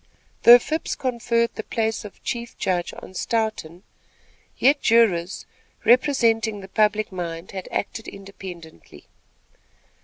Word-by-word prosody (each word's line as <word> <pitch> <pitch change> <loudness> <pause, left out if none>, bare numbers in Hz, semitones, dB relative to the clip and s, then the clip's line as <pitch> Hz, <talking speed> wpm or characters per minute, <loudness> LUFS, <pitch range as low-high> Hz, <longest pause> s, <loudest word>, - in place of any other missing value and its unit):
Though 240 +1 +10
Phipps 310 +6 -3
conferred 235 -2 0
the - - -5
place 220 0 -2
of 210 - -12
chief 235 -1 -5
judge 175 -2 -1
on - - -11
Stoughton, 205 -5 -2 0.7
yet 280 +3 +3
jurors, 200 -6 +2 0.4
representing 230 -4 +3
the 190 - -10
public 215 +1 +1
mind, 170 -1 -6 0.2
acted 225 +2 -4
independently. 185 - -11
220 Hz, 110 wpm, -23 LUFS, 185-235 Hz, 0.7 s, Though